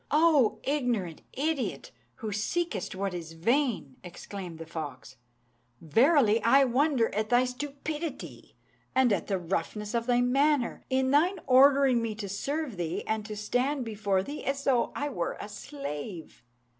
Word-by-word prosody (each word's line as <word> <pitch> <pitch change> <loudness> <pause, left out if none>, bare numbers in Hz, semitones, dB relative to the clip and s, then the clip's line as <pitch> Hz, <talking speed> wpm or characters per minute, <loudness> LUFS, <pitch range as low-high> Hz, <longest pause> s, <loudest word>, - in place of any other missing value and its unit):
"O 290 -8 +4
ignorant 245 - -1
idiot! 295 -1 -2 0.2
who 220 -4 -5
seekest 215 - -2
what 195 0 -2
is 165 -2 -6
vain," 230 - 0
exclaimed 180 -1 -8
the 165 - -8
fox, 155 -5 -7 0.6
"verily 225 - +4
I 270 +4 +5
wonder 260 -1 +2
at 215 +1 -1
thy 245 +1 +4
stupidity, 290 +4 -6 0.4
and 260 -4 +4
at - - -2
the 195 - 0
roughness 195 +5 -3
of 235 0 -1
thy 245 0 +3
manner, 275 +1 +2
in 260 0 +1
thine 340 +7 +3
ordering 270 -1 +5
me 225 -2 -3
to 210 -1 -5
serve 275 - -3
thee 170 -2 -3
and 220 -1 -1
to 215 - -5
stand 250 +6 -1
before 205 -3 0
thee 290 +8 -7
as 275 0 -2
though 255 -4 +2
I 290 - -2
were 175 -10 -3
a - - -6
slave. 205 - -7
240 Hz, 150 wpm, -28 LUFS, 200-280 Hz, 0.6 s, I